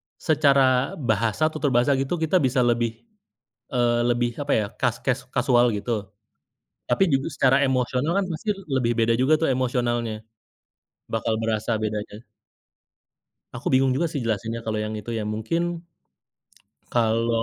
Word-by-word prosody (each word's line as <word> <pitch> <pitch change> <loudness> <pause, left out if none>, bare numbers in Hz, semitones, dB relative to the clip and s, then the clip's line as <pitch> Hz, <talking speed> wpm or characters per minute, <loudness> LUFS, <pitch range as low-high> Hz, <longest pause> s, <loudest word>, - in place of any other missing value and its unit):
secara 135 -4 +3
bahasa, 110 +6 +1
tutur 150 -3 -1
bahasa 120 +4 +3
gitu 135 +5 -2
kita 160 +2 +1
bisa 130 -1 +1
lebih 120 - 0 0.7
eee, 120 -1 +2
lebih 120 0 +1
apa 145 0 0
ya, 105 - +1
kas 120 -2 +1
kes 130 0 +1 0.2
kasual 125 -1 +4
gitu. 105 +4 -4 1.0
Tapi 125 +10 +2
juga 135 0 +1
secara 135 0 +4
emosional 130 +3 0
kan 200 - +1
pasti 165 +6 -7 0.3
lebih 120 -2 +1
beda 115 0 +3
juga 130 +4 +3
tuh - - +2
emosionalnya. 120 -3 -1 0.9
Bakal 115 0 0
berasa 110 0 -1
bedanya. 105 +1 -4 1.3
Aku - - -9
bingung 130 0 +4
juga 170 - +1
sih 145 - -2
jelasinnya 115 +1 -2
kalau 110 -1 -2
yang 110 - -4
itu 120 - -8
ya, - - -2
mungkin. 115 +11 -1 1.3
Kalau 115 0 +1
120 Hz, 140 wpm, -24 LUFS, 115-135 Hz, 1.3 s, kasual